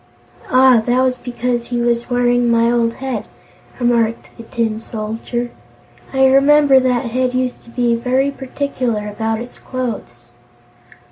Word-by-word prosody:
"Ah, 255 -2 +5
that 245 +1 +3
was 255 -1 0
because 240 -1 -3
he 240 -1 -2
was 235 0 0
wearing 245 -1 +2
my 230 0 +3
old 235 -1 +1
head," 260 -5 -4 0.5
remarked 235 -2 0
the - - -10
Tin 225 -2 -2
Soldier. 225 +2 -4 0.6
"I 265 0 +3
remember 275 +1 +5
that 250 -2 0
head 255 +1 0
used 255 -1 -1
to - - -15
be 240 0 +1
very 255 +4 +1
particular 255 -5 -3
about 220 +2 -2
its 245 - -10
clothes." 225 - -6
245 Hz, 140 wpm, -18 LUFS, 230-255 Hz, 0.6 s, Ah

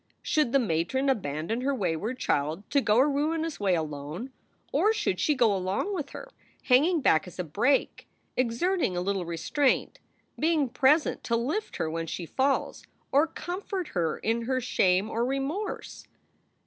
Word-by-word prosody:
Should 300 -6 +1
the 275 - +5
matron 235 +5 0
abandon 165 - -2
her 275 +2 0
wayward 205 +3 -2
child 155 - -1
to 280 - +3
go 215 -3 +2
a 265 +4 +5
ruinous 315 +3 -1
way 195 -3 +2
alone, 155 - -5 0.4
or 435 - +3
should 420 - -1
she 300 - +2
go 230 -6 +3
along 190 - -1
with 300 -7 -3
her, - - -9 0.3
hanging 305 +6 +4
back 180 -6 +3
as 180 - -11
a 180 - -1
brake, 225 - 0 0.3
exerting 255 - 0
a - - 0
little 190 -1 -1
restraint, 210 - 0 0.4
being 310 -4 +2
present 295 +5 +2
to 230 - +1
lift 295 - -2
her - - -1
when 165 +1 -3
she 170 - -4
falls, 270 - 0 0.3
or 290 +4 +4
comfort 360 +2 -5
her 165 -4 -1
in 230 +1 -1
her 260 +1 0
shame 190 -5 +2
or 230 +1 -1
remorse? 275 - -3
245 Hz, 160 wpm, -28 LUFS, 180-290 Hz, 0.4 s, the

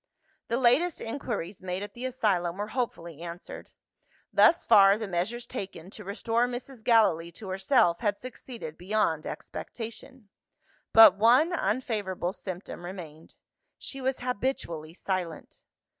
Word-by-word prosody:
The 235 - 0
latest 265 +8 +3
inquiries 225 -6 -4
made 185 +1 -3
at 205 - -8
the 245 +1 -6
asylum 195 -9 0
were 205 +1 -3
hopefully 170 - -4
answered. 170 +1 -8 0.6
Thus 340 - +5
far, 200 -2 +7
the 220 -1 -4
measures 195 +7 -2
taken 185 -2 -7
to - - -9
restore 225 +4 0
Mrs. 245 -1 -7
Gallilee 190 -8 +3
to 195 +2 -8
herself 190 -1 +3
had 205 -3 0
succeeded 240 -9 -9
beyond 180 -4 0
expectation. 230 0 -8 0.6
But 225 -4 +9
one 255 - +5
unfavourable 205 - -1
symptom 185 -3 -7
remained. 165 -4 -9 0.4
She 270 - -7
was 260 0 -1
habitually 200 - -3
silent. 185 -4 -4
210 Hz, 130 wpm, -28 LUFS, 180-245 Hz, 0.6 s, But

